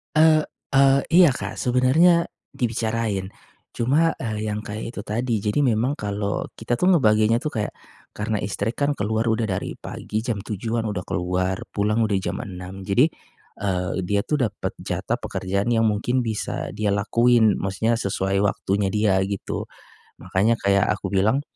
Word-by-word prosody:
E 155 Hz, -, +6 dB, 0.5 s
e 135 Hz, 0 st, +5 dB, 0.3 s
iya, 180 Hz, -4 st, +8 dB
Kak, 100 Hz, -4 st, -5 dB
sebenarnya, 155 Hz, +8 st, +4 dB, 0.3 s
dibicarain. 110 Hz, -4 st, -1 dB, 0.5 s
Cuma, 150 Hz, +8 st, +2 dB
e 110 Hz, -3 st, -3 dB
yang 105 Hz, 0 st, -2 dB
kayak 105 Hz, 0 st, -5 dB
itu -, -, -4 dB
tadi, 115 Hz, +3 st, -1 dB
jadi 105 Hz, +7 st, 0 dB
memang 125 Hz, +1 st, +2 dB
kalau, 100 Hz, 0 st, -2 dB
kita 120 Hz, +2 st, -2 dB
tuh 180 Hz, -, +2 dB
ngebaginya 110 Hz, -4 st, +4 dB
tuh 150 Hz, -, -2 dB
kayak, 105 Hz, -, -2 dB, 0.4 s
karena 105 Hz, 0 st, -1 dB
istri 100 Hz, +2 st, -2 dB
kan 145 Hz, 0 st, 0 dB
keluar 110 Hz, +2 st, 0 dB
udah 110 Hz, 0 st, +1 dB
dari 95 Hz, 0 st, -2 dB
pagi, 110 Hz, +1 st, -5 dB
jam 115 Hz, -4 st, -2 dB
7 110 Hz, +3 st, -3 dB
kan 115 Hz, -, -2 dB
udah 100 Hz, -4 st, -3 dB
keluar, 90 Hz, +1 st, -1 dB, 0.2 s
pulang 105 Hz, +2 st, +1 dB
udah 100 Hz, -2 st, +1 dB
jam -, -, -3 dB
6. 95 Hz, 0 st, -8 dB
Jadi, 105 Hz, +8 st, +4 dB, 0.6 s
eee, 90 Hz, -3 st, -1 dB
dia 100 Hz, +2 st, +1 dB
itu -, -, -4 dB
dapat 110 Hz, -5 st, -2 dB
jatah -, -, -2 dB
pekerjaan 100 Hz, +4 st, -2 dB
yang 115 Hz, -1 st, +3 dB
mungkin 115 Hz, +5 st, 0 dB
bisa 110 Hz, -2 st, -3 dB
dia 105 Hz, 0 st, 0 dB
lakuin, 115 Hz, +1 st, +3 dB
maksudnya 100 Hz, +4 st, 0 dB
sesuai 95 Hz, 0 st, 0 dB
waktunya 100 Hz, 0 st, 0 dB
dia, 105 Hz, -3 st, +3 dB
gitu. 100 Hz, -1 st, -4 dB, 0.6 s
Makanya 105 Hz, +5 st, +2 dB
kayak 100 Hz, +1 st, +3 dB
aku -, -, -5 dB
bilang, 105 Hz, +8 st, +2 dB
105 Hz, 160 wpm, -23 LUFS, 100-120 Hz, 0.6 s, iya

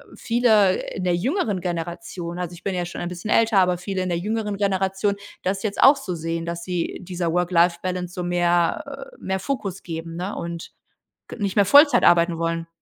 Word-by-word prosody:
viele 220 Hz, -5 st, +3 dB
in 185 Hz, -, -4 dB
der 180 Hz, -1 st, +2 dB
jüngeren 215 Hz, -, -1 dB
Generation, 175 Hz, 0 st, -5 dB
also 180 Hz, -1 st, -4 dB
ich 170 Hz, -, -13 dB
bin 195 Hz, -, -2 dB
ja 175 Hz, -1 st, -1 dB
schon 175 Hz, -, -7 dB
ein 175 Hz, -, -3 dB
bisschen 180 Hz, +4 st, -7 dB
älter, 225 Hz, -3 st, +4 dB
aber 180 Hz, -1 st, +3 dB
viele 185 Hz, +1 st, -3 dB
in 185 Hz, -, -3 dB
der 170 Hz, -, 0 dB
jüngeren 210 Hz, +2 st, -2 dB
Generation 195 Hz, 0 st, 0 dB, 0.3 s
das 195 Hz, +1 st, -1 dB
jetzt 210 Hz, -2 st, -2 dB
auch 275 Hz, +2 st, +8 dB
so 195 Hz, -10 st, -5 dB
sehen, 165 Hz, 0 st, -3 dB
dass 170 Hz, 0 st, -5 dB
sie 180 Hz, -1 st, -3 dB
dieser 175 Hz, -2 st, -2 dB
Work-Life-Balance 180 Hz, 0 st, +1 dB
so 180 Hz, -, -4 dB
mehr, 175 Hz, +10 st, 0 dB
äh, -, -, -16 dB
mehr 190 Hz, 0 st, -2 dB
Fokus 195 Hz, -5 st, -4 dB
geben, 165 Hz, -1 st, -6 dB
ne? 185 Hz, +4 st, -4 dB
Und 170 Hz, 0 st, -6 dB, 0.6 s
g -, -, -7 dB
nicht 200 Hz, -3 st, -2 dB
mehr 200 Hz, -, +5 dB
Vollzeit 290 Hz, -, +6 dB
arbeiten 170 Hz, 0 st, +4 dB
wollen. 165 Hz, 0 st, -2 dB
180 Hz, 195 wpm, -23 LUFS, 170-200 Hz, 0.6 s, auch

